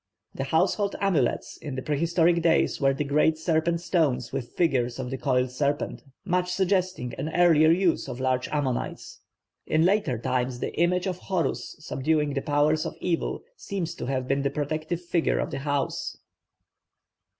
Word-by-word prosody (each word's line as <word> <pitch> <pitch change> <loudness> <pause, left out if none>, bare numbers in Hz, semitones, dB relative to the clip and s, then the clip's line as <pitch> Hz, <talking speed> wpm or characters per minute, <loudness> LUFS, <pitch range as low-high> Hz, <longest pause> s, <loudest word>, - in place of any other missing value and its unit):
The 135 - -3
household 190 +7 +1
amulets 170 -11 0
in 145 -4 -6
the 130 - -4
prehistoric 170 +3 +2
days 165 -2 +2
were 135 0 +4
the 150 - -1
great 150 +2 +2
serpent 165 +1 0
stones 140 -9 0
with 120 - -4
figures 125 -8 +1
of 130 -1 -4
the 135 - -2
coiled 125 -2 +1
serpent; 145 +3 -1 0.2
much 180 0 0
suggesting 185 -8 0
an 150 +4 -2
earlier 165 -3 +5
use 175 0 +2
of 120 - -6
large 130 -1 0
ammonites. 140 -5 -3 0.5
In 160 +1 +3
later 185 - +2
times 125 +1 -1
the - - -4
image 180 +3 +1
of 185 -2 -2
Horus 180 -8 -2
subduing 150 0 0
the 135 - -1
powers 150 +1 +2
of - - -5
evil 170 -2 -2
seems 185 - -4
to 170 - -6
have 130 -1 -1
been 135 +1 +1
the 140 - +1
protective 155 +4 -3
figure 170 -1 +1
of - - -2
the - - -3
house. 145 -1 -2
155 Hz, 165 wpm, -26 LUFS, 135-170 Hz, 0.5 s, earlier